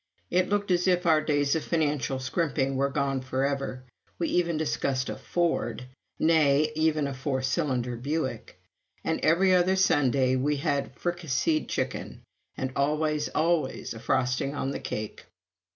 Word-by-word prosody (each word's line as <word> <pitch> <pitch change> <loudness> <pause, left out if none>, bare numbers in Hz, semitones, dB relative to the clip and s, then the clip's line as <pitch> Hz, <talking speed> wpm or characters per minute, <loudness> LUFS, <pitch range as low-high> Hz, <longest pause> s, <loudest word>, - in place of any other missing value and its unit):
It 185 0 +2
looked 205 -1 0
as 180 +1 +2
if 180 0 +2
our 160 -2 +5
days 145 -2 +1
of 160 - -1
financial 150 -5 0
scrimping 135 0 -1
were 140 +1 +1
gone 135 -1 -1
forever. 130 0 -2 0.3
We 170 - -1
even 170 -2 +1
discussed 140 -4 -1
a - - -4
Ford! 130 -5 -1 0.3
nay 155 -2 +3
even 155 -1 +1
a 140 - -3
four 130 0 -2
cylinder 130 -3 -1
Buick! 140 +3 -3 0.4
And - - -1
every 185 +4 +4
other 180 +1 +4
Sunday 140 -8 +3
we 145 +3 +1
had 140 -1 -1
fricasseed 160 -3 -1
chicken, - - -3 0.3
and 130 0 -2
always, 150 +1 0
always 160 -3 0
a 115 - -9
frosting 125 +4 0
on 135 - -2
the - - -4
cake. 105 0 -5
145 Hz, 150 wpm, -27 LUFS, 130-165 Hz, 0.4 s, our